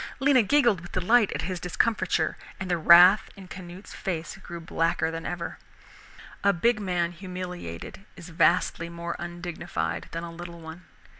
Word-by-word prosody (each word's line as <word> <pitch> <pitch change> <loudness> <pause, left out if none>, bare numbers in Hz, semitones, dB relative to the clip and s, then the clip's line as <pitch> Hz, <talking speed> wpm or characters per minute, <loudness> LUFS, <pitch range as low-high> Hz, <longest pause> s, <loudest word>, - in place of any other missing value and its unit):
Lena 270 -1 +5
giggled 235 - +3
with 175 - -12
delight 210 +4 +3
at - - -3
his 185 -2 -3
discomfiture, 180 -3 0 0.2
and 190 -1 -4
the 175 - +2
wrath 175 +5 +7
in 195 -2 -12
Canute's 180 +1 -10
face 170 -5 -4
grew 175 -3 -8
blacker 165 0 0
than 165 0 -5
ever. 175 -1 -5 0.8
A 200 - +5
big 220 +5 +2
man 180 -4 -1
humiliated 180 - -7
is 175 - -11
vastly 170 0 +2
more 170 0 -5
undignified 175 - -4
than 165 0 -4
a 170 - -6
little 170 0 -9
one. 160 +2 -10
175 Hz, 155 wpm, -26 LUFS, 170-190 Hz, 0.8 s, wrath